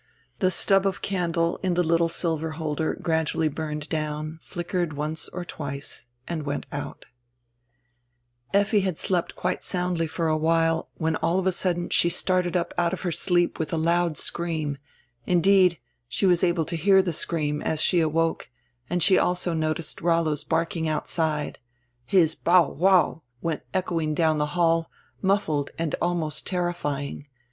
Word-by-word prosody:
The 185 - +3
stub 195 +2 +3
of 195 - -3
candle 170 -3 0
in 185 -2 0
the 180 - +3
little 165 0 +2
silver 160 -2 -1
holder 155 -1 -2
gradually 160 -1 0
burned 150 0 -5
down, 155 0 -3
flickered 175 -2 -3
once 150 +2 -3
or 180 0 -6
twice, 140 -6 -7 0.2
and 170 -2 -3
went 145 -1 -3
out 145 - -6 1.5
Effi 200 +2 +3
had 185 -4 -1
slept 180 -2 0
quite 180 - -2
soundly 180 -2 -1
for 165 +1 -2
a 155 - +2
while, 165 +1 +1
when 160 -1 0
all 170 +2 +1
of 190 - 0
a 190 - +3
sudden 175 -1 -1
she 170 - +3
started 180 0 +1
up 170 - -2
out 175 0 +1
of 185 - -4
her 180 - -1
sleep 175 +1 +1
with 155 -2 -2
a - - 0
loud 170 0 +1
scream, 160 -5 -2 0.5
indeed, 180 0 +4 0.3
she 195 - 0
was 180 -2 +3
able 170 -2 +2
to 170 - -4
hear 190 +4 +5
tire 180 - -1
screanr, 150 -2 -1
as 160 - -1
she 175 +2 +3
awoke, 165 -1 0 0.4
and 175 -1 +1
she 190 - +5
also 180 -1 0
noticed 155 0 -1
Rollo' 165 -1 +2
s 145 0 -4
barking 165 +1 -1
outside. 155 -1 -1 0.5
His 165 -3 +4
"bow 170 -1 +4
wow" 180 -1 +3 0.2
went 165 -2 -1
echoing 165 -5 -1
down 160 -1 +2
tire 150 - +1
hall, 165 0 +1 0.3
muffled 160 -8 +1
and 165 -2 -2
alnrost 165 -4 -1
terrifying. 150 -6 -3
165 Hz, 160 wpm, -25 LUFS, 155-180 Hz, 1.5 s, hear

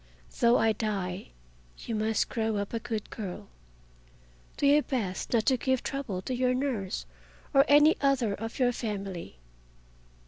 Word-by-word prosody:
Though 235 0 +5
I 225 - +3
die, 200 -4 -3 0.5
you 230 - -6
must 215 0 +1
grow 220 -2 -1
up 200 +2 -3
a 230 - 0
good 225 -2 -5
girl. 180 - -6 1.1
Do - - 0
your 290 +2 +6
best 220 -11 -3
not 230 -3 +2
to 260 - +3
give 260 0 0
trouble 250 -10 -4
to 255 - -3
your 250 0 +1
nurse 230 - -2 0.5
or 275 0 +6
any 295 +2 +6
other 270 -7 +2
of 225 +3 -6
your 250 -2 +3
family. 195 - -5
225 Hz, 150 wpm, -29 LUFS, 200-260 Hz, 1.1 s, your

